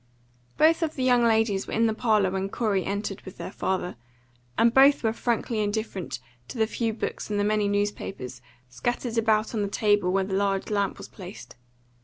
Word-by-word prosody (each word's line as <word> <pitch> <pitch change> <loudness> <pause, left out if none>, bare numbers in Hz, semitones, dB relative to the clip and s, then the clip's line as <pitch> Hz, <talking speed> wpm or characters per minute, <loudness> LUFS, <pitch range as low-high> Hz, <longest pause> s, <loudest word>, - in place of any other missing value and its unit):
Both 325 +2 +5
of 320 -2 -1
the 260 - -2
young 245 -2 +4
ladies 220 -4 +2
were - - -6
in 230 - +3
the 220 - +2
parlour 215 -4 +2
when 190 +1 -2
Corey 200 -4 0
entered 200 0 -3
with 190 - -11
their - - -6
father, 185 -6 -2 0.6
and 230 0 +4
both 275 +1 +6
were 220 -1 +2
frankly 230 -1 -1
indifferent 205 -3 -2 0.3
to - - -8
the 220 - +3
few 230 +1 -1
books 220 - -4
and 205 -1 0
the - - +2
many 210 0 +2
newspapers 200 -11 -3 0.3
scattered 235 - -2
about 220 0 +2
on 220 - 0
the 200 - 0
table 205 -2 +2
where 195 +1 +2
the 190 0 -4
large 195 +1 0
lamp 200 -2 0
was - - -9
placed. 190 0 -11
210 Hz, 195 wpm, -26 LUFS, 195-230 Hz, 0.6 s, both